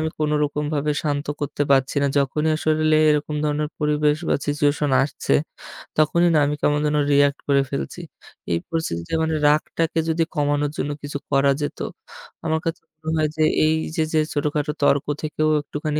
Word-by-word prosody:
আমি 160 0 -1
কোনো 150 0 +1
রকমভাবে 150 0 -1
শান্ত 145 -1 -1
করতে 145 0 -2
পারছি 135 -1 +3
না। - - +3
যখনই 150 +3 +1
আসলে 155 0 +2
এরকম 150 0 0
ধরনের 150 0 0
পরিবেশ 150 0 +2
বা - - +3
situation 145 0 +1
আসছে। 140 - -2 0.7
তখনই 170 +3 +3
না 155 - +4
আমি 145 +1 -1
কেমন 145 0 +2
যেন 150 0 +1
react 145 0 +3
করে 140 -1 +4
ফেলছি। 70 - -4 0.5
এই 85 - +2
পরিস্থিতিতে 85 - -3
মানে 160 0 0
রাগটাকে 160 +2 +1
যদি 165 +1 +2
কমানোর 145 -1 +1
জন্য 145 - -2
কিছু 145 0 -4
করা 140 0 +3
যেত, 145 - -4 0.7
আমার 160 0 +1
কাছে 165 - -2 0.2
মনে 160 0 -3
হয় 155 -1 +1
যে - - 0 0.2
এই 155 0 +3 0.2
যে, 160 - +2
যে, - - +3 0.2
ছোটখাটো 150 +1 -1
তর্ক 140 -1 +3 0.2
থেকেও 155 0 0
একটুখানি 150 +1 -3
150 Hz, 170 wpm, -22 LUFS, 145-155 Hz, 0.7 s, না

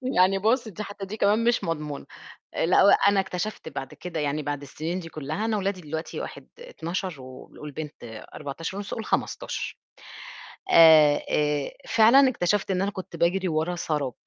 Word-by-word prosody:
يعني 185 +2 +4
بُصّ 230 +3 +2
دي 215 +1 -6
حتّى 200 -1 -7
دي 215 +3 -7
كمان 210 +3 +3
مش 240 0 +2
مضمونة، 150 -3 -4 0.6
لأ 180 - +5
وأنا 200 0 +5
اكتشفت 190 +2 -3
بعد 135 - -6
كده 170 -3 -6
يعني 150 +1 -1
بعد 145 0 -3
السِنين 160 +6 -4
دي 165 -2 -8
كلّها 155 +9 -4
أنا 220 -2 0
ولادي 195 -2 -2
دلوقتي 160 +1 -5
واحد - - -8
12 180 - -5
وال 130 0 -12
والبنت 150 -1 -8 0.3
14.5 165 +7 -5
قل 225 - -4
15، - - -3 1.0
آآ 155 -3 +7
آآ 150 -1 0 0.2
فعلًا 245 +5 +6
اكتشفت 195 -2 0
إن 185 0 0
أنا 200 +1 0
كنت 185 - -8
باجري 185 +2 +1
ورا 160 +2 -1
سراب، 150 -6 -2
175 Hz, 160 wpm, -26 LUFS, 150-200 Hz, 1.0 s, آآ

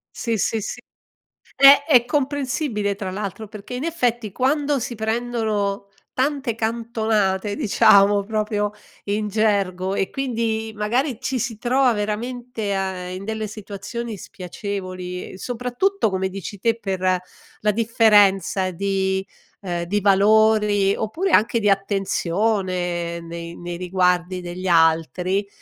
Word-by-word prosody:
Sì, 230 -2 -1
sì, 220 +2 0
sì, 230 - -5 0.8
è 280 +1 +8
è 250 -7 +5
comprensibile 260 -6 -1
tra 190 -2 -5
l'altro 205 +2 -5
perché, 215 +3 -9
in 255 +5 -4
effetti 240 - -1
quando 280 +3 +1
si 235 0 -4
prendono 220 -3 -1 0.3
tante 265 -4 -1
cantonate, 220 -3 0
diciamo, 200 -5 +4
proprio 210 -1 -1 0.3
in 210 +1 -1
gergo, 195 -3 0
e 195 - -1
quindi 225 -4 -2
magari 235 +4 -1
ci 260 0 -2
si 240 -2 -3
trova 250 +2 +2
veramente 220 0 -3
a 190 -2 -3
in 185 +2 -6
delle 220 0 -3
situazioni 215 +2 -6
spiacevoli, 185 -1 -6
uhm, - - -10
soprattutto 250 - -1
come 190 0 -1
dici 195 +1 -7
te, 230 +3 +1
per 185 -2 0 0.4
la 210 - +2
differenza 205 -4 +3
di, 190 +1 -1 0.4
ehm, 175 -3 -3
di 205 +4 -1
valori, 205 0 +4
oppure 330 - -2
anche 230 -1 +3
di 205 -2 +3
attenzione 185 -3 -1
nei 170 0 -7
nei 175 0 -6
riguardi 180 0 0
degli 180 +1 -6
altri, 170 +3 +2
210 Hz, 125 wpm, -22 LUFS, 190-230 Hz, 0.8 s, è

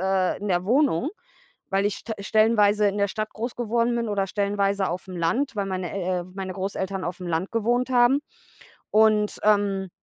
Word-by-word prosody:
äh, 190 -1 +1
in 205 +1 -5
der 180 0 +1
Wohnung, 270 - +2 0.6
weil 195 +1 +1
ich 205 - 0
st 225 - -5
stellenweise 210 0 +3
in 200 - -1
der 200 - +2
Stadt 215 +2 -4
groß 235 +3 -4
geworden 235 0 0
bin 230 -2 -1
oder 195 -1 0
stellenweise 200 -1 0
aufm 185 +1 -5
Land, 230 +10 0
weil 200 - -1
meine 185 -2 -3
El 185 -2 -1
äh, - - -7
meine 190 -1 -5
Großeltern 190 0 -3
aufm 180 +1 -5
Land 170 +3 -2
gewohnt 240 +3 +1
haben. 250 +2 +4 0.7
Und, 215 -1 +3
ähm, 200 -2 +2
200 Hz, 180 wpm, -25 LUFS, 190-220 Hz, 0.7 s, haben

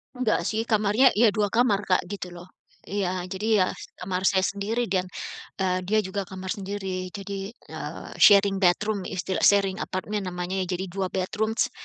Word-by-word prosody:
Enggak 230 -8 +1
sih 220 +5 -1
kamarnya 215 +4 +4
ya 220 0 +5
2 210 0 +1
kamar 210 -2 +2
Kak 185 - +3
gitu 180 -2 -7
loh, 175 +1 -10 0.4
iya 185 -2 -2
jadi 195 +3 -3 0.2
ya - - 0 0.3
kamar 185 +1 -1
saya 190 -1 +3
sendiri 205 +5 -1
dan, 185 -1 +1 0.5
eee, 185 -1 0
dia 215 +2 +3
juga 195 0 -3
kamar 190 0 -6
sendiri 195 -3 -4
jadi, 200 0 -5 0.2
eee, - - -8
sharing 200 -1 +6
bedroom 195 +2 +1
istilah 185 0 -2
sharing 195 -2 +4
apartemen 200 +1 -3
namanya 180 +1 -3
jadi 185 +1 -2
2 190 +1 -1
bedrooms 220 +7 0
195 Hz, 160 wpm, -26 LUFS, 185-210 Hz, 0.5 s, sharing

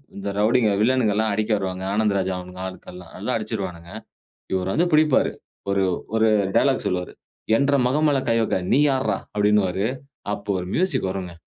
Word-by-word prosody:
இந்த 100 0 -4
ரவுடிங்க, 110 +1 +3
வில்லனுகல்லாம் 110 -3 +2
அடிக்க 110 +1 -1
வருவாங்க. 95 -1 -4
ஆனந்த் 105 -1 +1
ராஜா 95 0 -1
அவனுங்க 90 0 -9
ஆட்கள்லாம் 90 -1 -11
நல்லா 110 +7 -2
அடிச்சுருவானுங்க. 95 -5 -5 0.6
இவர் 95 0 -1
வந்து 175 +2 +2
பிடிப்பாரு. 150 -2 +4 0.4
ஒரு 100 -1 +2 0.3
ஒரு 110 0 +4 0.3
டயலாக் - - +2
சொல்லுவாரு. 90 -1 -3 0.4
"என்ற 140 +1 +2
மகன் 150 +4 +2
மேல 140 -2 +2
கை 115 - +3
வைக்க. 105 - 0
நீ 140 - +4
யார்றா?" 130 -1 0 0.2
அப்படின்னுவாரு. 105 -1 +2 0.5
அப்போ 105 0 -8
ஒரு 90 - -5
மியூசிக் 150 - +1
வருங்க. 90 -3 -5
105 Hz, 155 wpm, -23 LUFS, 95-125 Hz, 0.6 s, பிடிப்பாரு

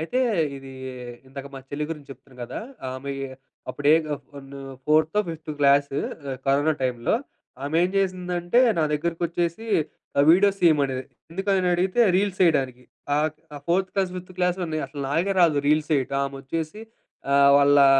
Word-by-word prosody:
అయితే 205 +11 -1 0.4
ఇది, 135 0 -10 0.6
ఇందాక 140 +1 -8
మా - - -6
చెళ్ళి 150 +1 -2
గురించి 150 -4 -7
చెప్తున్నా 130 0 -14
గదా! 120 - -5 0.3
ఆమె 140 +2 -5 0.6
అప్పుడే 145 +1 +2
గా 150 - -1
ఫోన్ను. 140 -1 -11 0.3
ఫోర్తో, 155 +6 +3
ఫిఫ్త్ 160 -1 -6
క్లాసు 140 0 +4 0.3
ఆహ్, 130 - -3
కరోనా 145 +3 +3
టైమ్‌లో. 120 - 0 0.5
ఆమె 145 +3 -1
ఏం 180 - +3
జేసిందంటే, 180 +2 +1 0.2
నా 160 - +3
దగ్గరకొచ్చేసి 170 +5 -1 0.5
ఆహ్, 140 - +6
వీడియోస్ 195 +3 +4
తీయమనేది. 140 -6 +3 0.3
ఎందుకనడిగితే 185 +2 +1 0.2
రీల్స్ 195 -1 0
చేయడానికి. 130 -7 +2 0.3
ఆహ్, 150 +1 +2 0.3
ఆ - - -6
ఫోర్త్ 185 +2 +2
క్లాస్, 190 -2 0
ఫిఫ్త్ 180 0 -8
క్లాసులోనే, 180 -3 0
అసలు 140 +1 -7
నాకే 175 +7 +1
రాదు 150 -5 +4
రీల్స్ 155 +1 +2
చేయటం. 135 -1 +1
ఆమొచ్చేసి 155 +8 -5 0.5
ఆహ్, 140 0 +6
వాళ్ళా 140 0 +6
155 Hz, 145 wpm, -24 LUFS, 140-180 Hz, 0.6 s, ఆహ్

